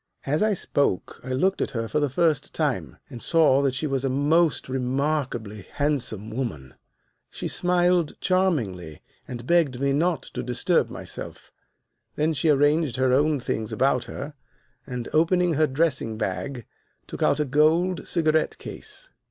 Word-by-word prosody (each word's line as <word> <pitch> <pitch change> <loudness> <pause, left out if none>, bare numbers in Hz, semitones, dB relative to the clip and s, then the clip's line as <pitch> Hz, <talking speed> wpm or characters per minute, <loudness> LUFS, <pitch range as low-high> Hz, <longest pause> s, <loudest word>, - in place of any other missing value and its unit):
"As 150 +3 0
I 215 0 +3
spoke 140 - -1
I 130 - -6
looked 185 +10 +1
at - - 0
her 115 0 -2
for 150 - 0
the 145 -1 +1
first 155 +3 0
time, - - -1
and 120 - -8
saw 155 -5 +4
that 135 -2 0
she 130 - -2
was 135 -3 -1
a 135 - +1
most 150 +4 +2
remarkably 130 -5 -2
handsome 125 -8 -1
woman. 95 - -4 0.6
"She - - -5
smiled 175 -2 +1
charmingly 120 - -1 0.2
and 120 -1 -7
begged 155 -6 +2
me 140 0 +1
not 165 +3 +1
to 125 - -6
disturb 125 -1 +1
myself. - - -8 0.6
Then 155 +2 +1
she 155 +2 0
arranged 145 -1 +3
her 130 0 +2
own 145 +2 +3
things 110 -3 -3
about 130 -1 +1
her, 140 +3 -7 0.5
and, 125 -3 -5
opening 175 +2 +3
her 155 +1 +3
dressing 135 -6 0
bag, 125 0 -3 0.4
took - - -8
out - - +3
a 150 - +1
gold 160 +6 +2
cigarette 160 -2 +1
case. - - -8
140 Hz, 155 wpm, -25 LUFS, 125-160 Hz, 0.6 s, saw